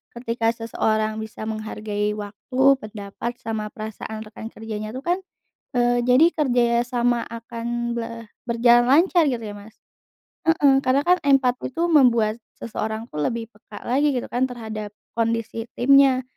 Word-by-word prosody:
ketika 230 -1 -2
seseorang 220 -1 -1
bisa 220 0 -8
menghargai 215 -1 -3
waktu, 210 +5 -7 0.2
pendapat, 210 +2 -6
sama 220 -2 -3
perasaan 220 0 -7
rekan 220 +1 -9
kerjanya 215 -1 -6
itu - - -3
kan, 350 +2 +1 0.6
eee, 245 0 +3
jadi 255 +6 +6
kerja 250 -5 +2 0.2
sama 240 -1 +1
akan 235 +1 -4
be 230 - -2 0.4
berjalan 240 +1 +5
lancar 340 +3 +5
gitu 245 -4 -1
ya, 205 -1 -6
Mas? 205 +2 -13 0.7
Heeh, 290 -4 +5
karena 265 +2 +3
kan 360 +1 +4
empati 265 -3 +2
itu 335 - 0
membuat 235 -7 +4 0.2
seseorang 220 0 -4
tuh 150 - -5
lebih 230 -2 -2
peka 210 0 -12
lagi 280 +4 +2
gitu 245 - -3
kan, 245 +2 +2
terhadap 220 -4 -6 0.3
kondisi 230 0 -1
timnya. 270 0 +5
230 Hz, 145 wpm, -23 LUFS, 215-250 Hz, 0.7 s, jadi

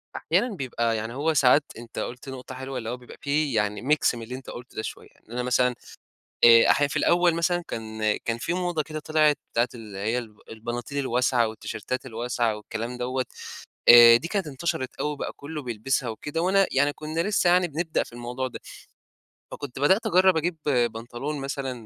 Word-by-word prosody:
أحيانًا 205 +7 0
بيبقى 120 -6 -1
يعني 110 +2 -4
هو 150 +5 0
ساعات 140 +1 +5
أنت 115 0 -8
قُلت 125 +3 -6
نقطة 130 0 -8
حلوة، 130 +1 -6
اللي 115 -2 -4
هو 125 - -3
بيبقى 125 -1 -14
في 145 -1 0
يعني 105 -1 0
ميكس 140 -1 +2
من 115 - -7
اللي 120 +3 -6
أنت 130 0 -10
قُلته 120 +1 -10
ده - - -2
شوية، - - -8 0.2
إن - - -17
أنا 125 +1 -2
مثلًا 125 0 +2 0.7
آآ، 115 -1 +8
أحيانًا 145 0 +3
في 145 - -5
الأول 175 0 +3
مثلًا 175 +1 +1
كان 110 -1 -2
كان 115 0 -3
في 130 +8 -2
موضة 175 -3 -1
كده 155 +1 -6
طِلعت 155 -1 +2 0.2
بتاعة 120 +2 +2
اللي 110 -4 -9
هي 110 +5 0
الب 110 -4 -8
البناطيل 120 +5 -5
الواسعة 125 -3 +2
والتيشيرتات 110 +3 -5
الواسعة 120 -1 -1
والكلام 115 +3 -6
دوّة، 130 +1 -1 0.6
آآ، 120 -1 +10
دي 160 +8 -4
كانت 195 -1 -1
انتشرت 135 -2 -3
أوي - - 0
وبقى 145 - -5
كله 150 +1 -7
بيلبسها 125 +1 -1
وكده، 150 +8 -4
وأنا 195 +2 +3
يعني 140 +2 +3
كنا 155 +2 -4
لسه 185 -1 +2
يعني 180 0 +4
بنبدأ 160 +1 -1
في - - -16
الموضوع 120 +2 -4
ده. - - -9 0.9
فكنت 140 -3 -7
بدأت 190 - +3
أجرّب 185 -3 +4
أجيب 165 +2 0
بنطلون 120 +2 -1
مثلًا 135 -1 -3
130 Hz, 190 wpm, -25 LUFS, 120-155 Hz, 0.9 s, آآ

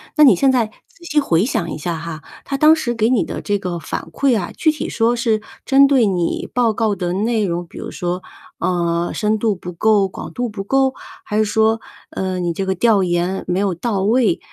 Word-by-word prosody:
那 300 - +6
你 270 - +8
现 275 -1 +3
在 245 -4 +2 0.2
仔 475 -6 -22
细 305 -3 +1
回 175 - +2
想 175 -8 -1
一 - - -5
下 165 +2 -3
哈， 160 -1 -7 0.2
他 275 - -2
当 305 +3 +6
时 260 -7 -1
给 225 0 +2
你 250 -3 +2
的 - - -5
这 205 -1 -1
个 180 -3 -4
反 - - -5
馈 260 -5 +2
啊， 180 - -5
具 315 - +3
体 305 - -5
说 230 +1 +1
是 230 -3 0 0.2
针 275 +1 +6
对 270 -4 +4
你 180 -4 -1
报 240 -2 +2
告 215 -1 0
的 175 -1 -2
内 215 +3 0
容 175 -1 -3
比 - - -14
如 - - -6
说， 180 +1 -3 0.4
呃， 170 -1 0
深 215 0 0
度 215 -2 0
不 180 0 -8
够、 205 +2 +3
广 190 - -8
度 245 0 -2
不 210 -3 -6
够？ 265 +5 +2 0.3
还 210 - -2
是 215 - +4
说， 220 +1 +2 0.3
呃， 185 -1 -3
你 175 -1 -1
这 195 +3 -3
个 190 - 0
调 210 0 +3
研 175 +1 -1
没 180 +1 -1
有 195 -3 0
到 200 +2 -2
位、 240 - +2
210 Hz, 245 characters per minute, -19 LUFS, 180-240 Hz, 0.4 s, 你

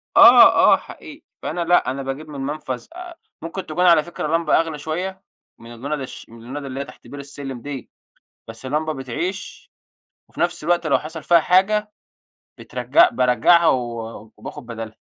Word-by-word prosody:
آه - - +8
آه، - - +5
حقيقي. - - -12 0.2
فأنا 170 +3 -3
لأ، 175 -6 +3
أنا 135 +1 -5
باجيب 140 +4 -6
من 140 -2 -7
منفذ، 135 -3 -4
آآ 355 -1 -9 0.3
ممكن 170 +4 -6
تكون 180 +4 0
على 165 -3 +6
فكرة 170 -3 -5
لمبة 165 -2 +2
أغلى 165 -2 -2
شوية 185 +5 -4 0.4
من 115 +1 -12
اللُنض 140 +5 -4
الش 130 - -9
من 115 - -14
اللُنض 140 +4 -7
اللي 135 0 -6
هي 140 - -3
تحت - - -15
بير 145 - -9
السلم 140 -3 -8
دي، 140 -3 -7 0.6
بس 115 +3 -9
لمبة 155 +3 -1
بتعيش، 170 +9 -6 0.6
وفي - - -14
نفس 175 -2 -1
الوقت 170 -1 +1
لو 140 - +3
حصل 160 +1 -8
فيها 170 -1 +5
حاجة 210 +5 +2 0.7
بترجع 350 +2 +3
بارجعها 160 +7 +4
و 115 -4 -3
وباخد 145 -5 -9
بدالها. 115 -2 -6
150 Hz, 170 wpm, -21 LUFS, 130-175 Hz, 0.7 s, آه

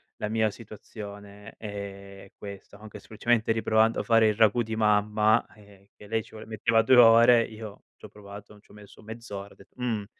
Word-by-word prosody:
la 105 - -5
mia 110 0 +1
situazione 105 -1 -12
è 100 -2 -9
questa, 100 0 -11
anche 105 0 -11
semplicemente 115 +2 -1
riprovando 110 0 +1
a - - -3
fare 115 -1 +3
il 105 - -1
ragù 110 +2 +3
di 110 0 -5
mamma, 105 0 +2
ehm, 100 -2 -20
che 105 - -15
lei 110 +1 -2
ci - - -20
voleva 110 0 -12
metteva 115 +1 +1
2 130 - +4
ore, 115 0 +6
io 110 -2 -10
ci - - -14
ho - - -12
provato, 105 0 -13
n 105 - -20
ci - - -25
ho - - -17
messo 105 0 -16
mezz'ora, 105 -3 -9
ho - - -23
detto: 100 - -21
"Mhmm, 115 -5 -3
105 Hz, 200 wpm, -26 LUFS, 100-115 Hz, -, ore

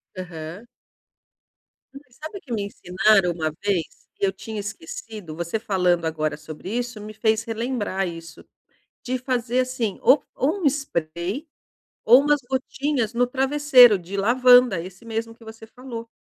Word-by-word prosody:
Aham. 175 +3 -8 1.4
Sabe 315 - -9
que 255 - -14
me 210 -3 -1
ensinaram 195 -1 +2
uma 160 -2 -2
vez 195 -6 +1 0.3
que - - 0
eu 190 - +1
tinha 215 +3 -7
esquecido, 215 - -7
você 170 +6 -3
falando 180 -5 +1
agora 155 -2 -1
sobre 155 +7 -7
isso 245 -2 -3
me 215 +1 -8
fez 220 0 +1
relembrar 225 -4 -2
isso 165 -1 -9 0.6
de 255 0 -2
fazer 250 -1 -1
assim, 250 -5 -2
ou 265 +4 +5
ou 335 +8 -1
um - - +1
spray 195 - -2 0.6
ou 250 - +8
umas 295 0 +2
gotinhas 265 -2 -1
no 245 +1 +2
travesseiro 265 -4 +5
de 180 +3 -7
lavanda, 245 -1 +5
esse 185 +6 -11
mesmo 225 0 -4
que 230 - -18
você 220 0 -11
falou. 230 -1 -9
220 Hz, 145 wpm, -23 LUFS, 185-255 Hz, 1.4 s, ou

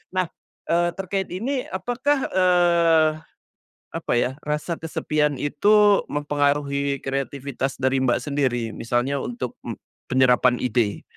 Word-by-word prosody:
nah, 185 - +2 0.4
eee, 175 +1 +2
terkait 195 0 -3
ini, 250 +8 -3
apakah, 255 +8 -1
eee, 170 -3 +4 0.9
apa - - -3
ya, 125 +2 +1
rasa 150 +3 -2
kesepian 150 -3 -1
itu, 205 +6 +4
mempengaruhi 140 -1 0
kreativitas 135 0 -3
dari 130 +1 +2
Mbak 120 - +2
sendiri? 130 -5 -1
Misalnya 120 +4 -1
untuk, 125 0 -5
mmm, - - -5 0.4
penyerapan 125 -1 +4
ide? 115 -4 0
145 Hz, 115 wpm, -23 LUFS, 130-175 Hz, 0.9 s, eee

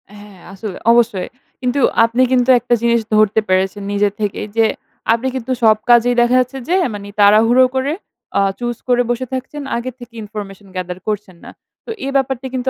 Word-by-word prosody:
হ্যাঁ 205 -2 -14
আসলে, 195 -1 -7
অবশ্যই। 230 -6 +2 0.3
কিন্তু 250 +2 0 0.3
আপনি 230 +2 0
কিন্তু 255 0 +2
একটা 240 - -1
জিনিস 235 0 +2
ধরতে 215 0 +4
পেরেছেন 190 +2 0
নিজের 205 0 +1
থেকেই 210 0 -2
যে, 225 - +5 0.5
আপনি 235 +3 -1
কিন্তু 260 0 -4
সব 215 -1 +5
কাজেই 240 +1 +5
দেখা 240 +1 +3
যাচ্ছে 255 +2 -2
যে 360 - +3 0.2
মানে 200 0 -7
তাড়াহুড়ো 225 +5 +6
করে 270 +3 0 0.5
আ - - +3 0.2
choose 240 -1 -3
করে 245 -1 +3
বসে 240 +2 -1
থাকছেন। 265 +3 -5
আগে 255 +2 -4
থেকে 240 -1 -12
ইনফরমেশন 205 -2 -9
gather 180 0 -4
করছেন 205 -4 -4
না। - - -10 0.3
তো - - -12 0.2
এ - - -3
ব্যাপারটা 265 -1 0
কিন্তু 255 0 -1
235 Hz, 180 wpm, -17 LUFS, 205-250 Hz, 0.5 s, তাড়াহুড়ো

